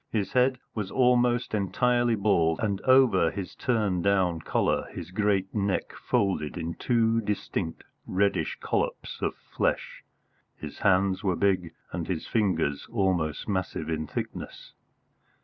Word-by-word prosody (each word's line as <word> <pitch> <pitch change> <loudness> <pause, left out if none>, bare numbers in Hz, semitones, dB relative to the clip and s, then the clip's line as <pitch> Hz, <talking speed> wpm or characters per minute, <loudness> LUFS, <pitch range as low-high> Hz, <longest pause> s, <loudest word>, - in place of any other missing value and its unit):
His 105 -4 -2
head 130 +1 +3 0.2
was 105 -4 -3
almost 125 -2 +2
entirely 120 +4 +2
bald, 90 -6 +2
and 100 -3 -1
over 130 -10 +5
his 100 -2 -6
turn 105 -7 0
down 95 -3 +2
collar - - 0
his - - -8
great 100 -1 0
neck 100 -2 -1
folded 95 -6 -1
in 85 0 -3
two 115 0 +1
distinct 100 -5 -3 0.2
reddish 100 +2 0
collops - - -2
of - - -1
flesh. - - -2 0.5
His 75 -2 -8
hands 95 -1 +2
were 95 -3 +1
big 95 -3 0 0.2
and 85 -1 -4
his 90 -4 -3
fingers 80 -10 0
almost 90 -8 0
massive 95 -5 -2
in 80 -1 -2
thickness. - - -6
100 Hz, 130 wpm, -27 LUFS, 90-110 Hz, 0.5 s, over